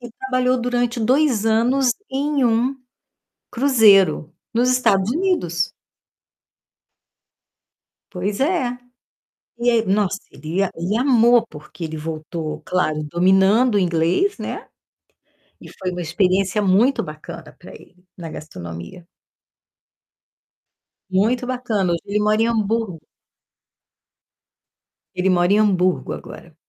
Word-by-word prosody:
e 240 -1 -9
trabalhou 255 0 -1
durante 245 -1 -1
2 250 -2 +2
anos 245 +3 +2 0.2
em 280 0 0
um 240 +4 +1 0.8
cruzeiro 200 - +4 0.2
nos 245 +2 +2
Estados 220 -5 +2
Unidos. 270 - -1 2.4
Pois 200 +5 -3
é. 270 -6 0 0.8
E 240 +1 +1
aí, 230 -2 +2
nossa, 200 0 +1
ele 160 +6 -2
a 195 - -1
ele 180 +6 -2
amou, 240 -2 +4
porque 150 +1 -11
ele 160 0 -5
voltou, 155 0 -5
claro, 155 -4 -1
dominando 190 - +3
o - - +4
inglês, 175 - +1
né? - - -6 0.9
E - - -12
foi 185 -1 -3
uma 180 - -5
experiência 185 +4 +1
muito 210 +7 +2
bacana 155 0 -10
pra - - -13
ele - - -16 0.2
na 170 -2 -7
gastronomia. 85 - -9 2.0
Muito 225 +7 +1
bacana. 220 -8 -1
Hoje 170 - -2
ele 205 +1 -1
mora 215 +1 +2
em - - +2
Hamburgo. 220 -5 -1 2.1
Ele 185 +1 +1
mora 175 +1 +2
em 210 - +4
Hamburgo, 185 -4 +1
agora, 170 - -10
210 Hz, 110 wpm, -20 LUFS, 175-245 Hz, 2.4 s, cruzeiro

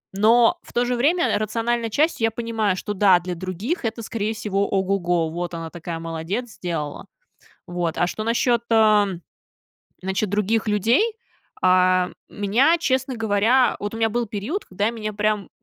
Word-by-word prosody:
Но 230 - +4
в - - -17
то 240 +1 +2
же 245 0 0
время 295 -1 +2
рациональной 230 +2 -1
частью 290 0 +1
я 225 - +1
понимаю, 225 -4 -1
что, 205 +2 -4
да, 195 -2 +5
для 180 +1 -5
других 185 - -4
это, 230 0 -3
скорее 220 0 -3
всего, 200 -2 -1
ого-го, 180 -4 0
"вот 175 +1 -4
она 165 -1 -6
такая 170 -1 -6
молодец, 165 +9 -4
сделала". 165 -5 -5 0.6
Вот. 175 -2 -3
А 175 - +3
что 215 +4 -4
насчет, 235 +1 +1
а, 215 -2 +5 0.9
значит, 190 +2 -1
других 210 +2 0
людей. 220 - +3 0.6
А, 185 0 +4 0.2
меня, 240 +12 +2
честно 265 -3 0
говоря 225 +3 +2
вот 205 +1 -4
у - - -5
меня 225 0 +2
был 240 +2 -1
период, 220 - -4
когда 200 +3 -1
меня 215 -2 -5
прям 210 -1 -1
210 Hz, 160 wpm, -22 LUFS, 185-230 Hz, 0.9 s, да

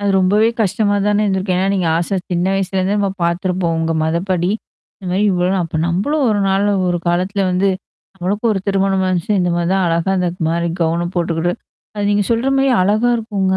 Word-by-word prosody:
அது 200 0 0
ரொம்பவே 205 +4 +3
கஷ்டமா 205 0 +1
தானே 210 0 +2
இருந்திருக்கும். 190 -2 0
ஏன்னா, 190 - +1
நீங்க 185 -3 0
ஆசையா, 175 +3 -1
சின்ன 175 +1 0
வயசுலேருந்தே 190 0 0
நம்ம 200 -1 0
பார்த்துருப்போம் 175 0 0
உங்க 165 0 0
மதப்படி. 175 +2 0 0.5
இந்த 190 - -11
மாரி 190 +3 +1
இவ்ளோ 180 -1 +1
நா - - +1
அப்ப 165 - -5
நம்பளும் 240 - 0
1 210 -1 +1
நாள் 195 +1 +2 0.2
1 175 0 0
காலத்தில 185 +3 0
வந்து, 185 +2 +1 0.5
நம்மளுக்கும் 205 +5 -1
1 195 - -2
திருமணம் 195 -1 +1
வந்துச்சுனா 185 +3 0
இந்த 180 -1 +1
மாரி 170 0 0
தான் 190 -1 +1
அழகா 170 +3 0
இந்த 180 -1 +1 0.2
மாரி 170 +1 0
கௌன 170 +1 0
போட்டுக்கிட்டு. 170 0 0 0.4
அது 205 -1 -2
நீங்க 205 0 +2
சொல்ற 230 +3 +1
மாரி 270 0 +3
அழகா 215 +5 +2
இருக்குங்க. 200 -4 -1
190 Hz, 190 wpm, -17 LUFS, 175-205 Hz, 0.5 s, ரொம்பவே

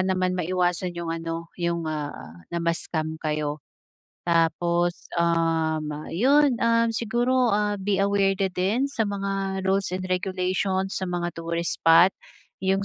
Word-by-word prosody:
naman 185 -1 +1
maiwasan 180 0 -1
'yong 170 -1 -3
ano, 165 0 -5
'yong, 170 -1 -1
ah, 145 - -5
na 170 - -4
ma-scam 160 -1 -2
kayo. 150 -1 -2 0.7
Tapos, 170 +1 +1
um, 165 -2 +1 0.2
'yon 275 - +4 0.4
siguro 240 +3 +1 0.3
be 195 0 0
aware 195 -1 +2
din 195 +6 0
sa 225 -7 -1
mga 195 -1 -2
rules 195 0 +1
and 185 - -5
regulations 190 0 -1
sa 190 - -2
mga 175 -1 -2
tourist 170 0 -2
spot, 165 +3 +6 0.5
'yong 195 +1 +1
180 Hz, 120 wpm, -25 LUFS, 165-195 Hz, 0.7 s, spot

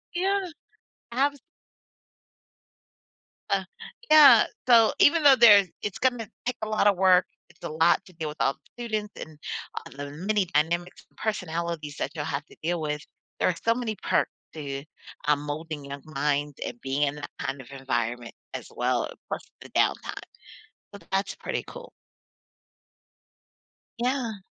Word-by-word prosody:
Yeah. 385 0 +1 0.6
Abs 280 +3 +1 2.1
Uh, - - +2 0.5
yeah, 305 -2 +9 0.2
so, 230 -3 +6
even 325 +2 +5
though 280 -2 +8
there's 205 -5 +8
it's 205 - -3
gonna 245 -4 0 0.2
take 250 0 -1
a 215 - -2
lot 215 -1 +1
of 200 - +3
work 185 -1 +5 0.2
it's - - -24
a - - -3
lot 160 +2 +3
to 185 - -16
deal 160 -2 -4
with 150 - -7
all 135 - +2
the 245 - -13
students 215 -2 -3
and 155 -1 -9 0.5
a - - -9
the 145 0 -6
many 190 +6 0
dynamics 170 +2 -1
and - - -35
personalities 170 -7 -3
that 140 - -2
you'll 150 -2 -3
have 145 -1 -3
to - - -18
deal 170 +1 0
with. 150 -1 -2 0.4
There - - +3
are 180 - +1
so 230 0 +4
many 235 -3 -2
perks - - +2 0.2
to, 140 -2 -5 0.4
um, 150 -1 +4
molding 150 0 -5
young 140 0 -7
minds 145 -1 -1
and - - -6
being 135 +2 -1
in 145 0 +2
that 145 - -7
kind 135 0 -3
of 130 - -12
environment 120 -3 -3 0.2
as - - -6
well - - 0 0.2
plus - - -3 0.2
the - - -11
downtime. - - 0 0.8
So, 200 - -9
that's 195 +1 0
pretty - - -4
cool. - - -10 2.1
Yeah. 235 -5 -1
175 Hz, 155 wpm, -27 LUFS, 145-225 Hz, 2.1 s, yeah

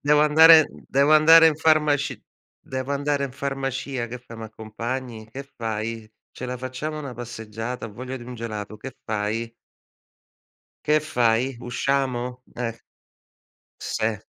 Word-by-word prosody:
"Devo 150 +1 +4
andare 160 +1 +8 0.2
devo 140 +3 +3
andare 160 +1 +8
in 150 - -1
farmaci 150 -2 +2 0.4
devo 130 +1 -4
andare 140 0 0
in 130 - -6
farmacia. 135 -2 -3
Che 125 +2 -7
fai? 120 -1 -12
Mi 110 - -6
accompagni? 110 +1 -6
Che 135 +4 -6
fai? 110 -1 -4 0.2
Ce 130 - -7
la 125 0 -4
facciamo 130 +5 -5
una 140 -4 -6
passeggiata? 115 0 -6
Ho 105 - -11
voglia 130 +4 -6
di 120 - -10
un 125 0 -8
gelato. 110 -2 -6
Che 130 +4 -9
fai?" 110 +2 -2 1.3
"Che 150 +1 +4
fai? 120 -2 +1
Usciamo?" 125 0 -1
E 115 -1 -4 1.0
se. 110 -2 -2
125 Hz, 140 wpm, -24 LUFS, 115-140 Hz, 1.3 s, andare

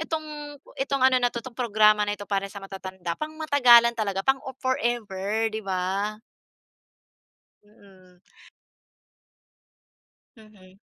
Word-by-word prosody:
itong, 305 -2 -5 0.2
itong 275 -1 0
ano 255 -1 +5
na 245 - +3
'to 235 -1 -7
'tong 260 - -9
programa 215 -3 +3
na 205 - -1
'to 205 - -9
para 195 -1 -2
sa 200 0 -10
matatanda 190 -3 -6
pang-matagalan 285 -7 +5
talaga 200 -4 -3
pang-forever 235 -6 -1
'di 220 - -3
ba? 195 +2 -2 1.5
Mm. 190 -4 -21 2.2
Mhm. 195 -3 -19
215 Hz, 105 wpm, -25 LUFS, 195-260 Hz, 2.2 s, ano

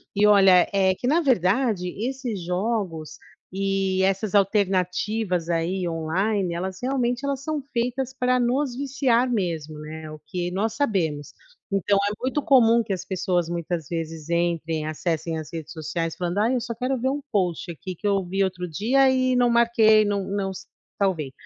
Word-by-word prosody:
E 210 +1 +4
olha, 195 -3 +6
é 190 -1 +3
que 245 - -4
na 320 +6 +3
verdade, 220 - +1 0.2
esses 255 -7 -4
jogos 180 -5 -2 0.3
e 195 0 0
essas 195 +2 0
alternativas 190 -1 +1
aí 175 +2 -1
online, 175 +4 -1
elas 185 +2 -4
realmente 250 0 0
elas 275 -1 -2
são 305 -1 -3
feitas 250 +2 -1
para 255 -1 +1
nos 250 +2 0
viciar 265 -3 +1
mesmo, 160 -7 -2
né, 155 +1 -8
o 155 - -9
que 175 +2 -3
nós 210 +4 -1
sabemos. 170 - -1 0.4
Então, 195 +1 +2
é 200 +1 +1
muito 265 +3 0
comum 235 -4 +5
que 210 - -3
as 185 - -5
pessoas 180 -2 -1
muitas 170 -3 -3
vezes 165 -2 -5
entrem, 165 -2 0
acessem 160 +1 -2
as 155 - -8
redes 160 -2 -6
sociais 165 +1 -3
falando: 180 +2 -2
"Ai, 230 +5 +2
eu 245 - 0
só 235 0 -4
quero 255 +3 -1
ver 260 +3 0
um 285 +2 -2
post 180 -4 -1
aqui 180 +4 -7
que 205 - -4
eu 200 -1 +2
vi 195 +2 0
outro 180 -1 -2
dia 250 - +3
e 255 -1 +2
não 245 -1 +3
marquei, 230 -2 +5
não 200 -1 0
não 195 0 -2 0.5
salvei." 165 -9 0
195 Hz, 170 wpm, -24 LUFS, 170-235 Hz, 0.5 s, olha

